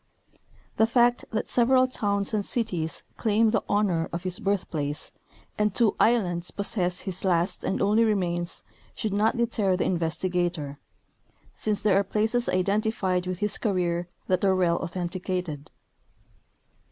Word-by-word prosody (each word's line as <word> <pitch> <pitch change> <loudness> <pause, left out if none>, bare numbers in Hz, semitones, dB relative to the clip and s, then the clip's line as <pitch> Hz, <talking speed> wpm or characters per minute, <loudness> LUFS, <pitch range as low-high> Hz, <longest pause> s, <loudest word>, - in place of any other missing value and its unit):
The 220 - +4
fact 240 +1 +3
that 220 - -2
several 255 +1 +4
towns 200 -5 0
and 210 -1 +1
cities 185 -9 -2
claim 220 0 +2
the 220 - +1
honor 195 -6 +1
of 170 +1 -4
his 185 +2 -3
birth 200 -3 -1
place 145 -1 -3 0.5
and 210 -2 +1
two 230 -4 +3
islands 180 -7 +2
possess 180 -3 0
his 190 -2 -5
last 180 0 0
and - - -1
only 210 +3 +4
remains 175 -5 -1 0.3
should 215 -3 -2
not 215 +3 +2
deter 215 -5 +1
the - - 0
investigator, 170 -3 -1 0.7
since 210 -2 -2
there 195 -2 +4
are - - +1
places 220 +4 0
identified 190 -1 0
with 185 -1 -2
his 210 +2 0
career 175 -5 0 0.2
that 185 0 0
are 190 -1 +4
well 175 -2 +2
authen 175 0 -3
ticated. 175 -5 -4
190 Hz, 145 wpm, -26 LUFS, 175-215 Hz, 0.7 s, The